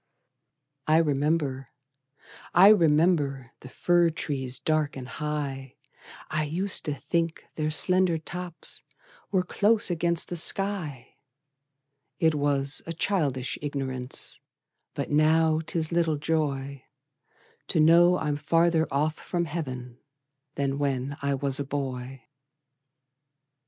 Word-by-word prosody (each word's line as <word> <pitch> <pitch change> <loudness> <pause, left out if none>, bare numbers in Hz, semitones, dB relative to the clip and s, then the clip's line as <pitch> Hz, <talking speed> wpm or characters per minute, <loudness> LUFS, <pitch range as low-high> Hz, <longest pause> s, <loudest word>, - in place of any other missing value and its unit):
I 155 +1 +5
remember, 145 -3 0 0.9
I 190 +3 +9
remember, 150 - +3
The 130 - -11
fir 175 +3 +2
trees 130 -5 -4
dark 155 -1 0
and 125 -1 -7
high; 140 -3 -4 0.5
I 155 0 -1
used 185 +6 -1
to 150 -3 -2
think 165 +5 -2
their 155 -1 -2
slender 180 +2 +3
tops 175 +1 -4 0.5
Were 190 -2 +2
close 205 +2 +2
against 170 0 -1
the 175 - -3
sky: 170 -8 -2 1.0
It 160 -3 +3
was 145 -1 0
a 165 - -3
childish 145 -8 -1
ignorance, 135 -3 -2 0.5
But - - -4
now 155 +1 +4
'tis 160 0 -3
little 165 -3 +1
joy 140 -3 -2 0.8
To 165 - +1
know 170 +3 +6
I'm 150 -2 -1
farther 165 +2 +2
off 150 +3 0
from 175 -1 -2
Heav'n 130 -6 -6 0.6
Than 140 0 -1
when 140 -1 -1
I 140 0 0
was 135 0 -2
a - - 0
boy. 135 -2 -5
150 Hz, 115 wpm, -27 LUFS, 135-170 Hz, 1.0 s, I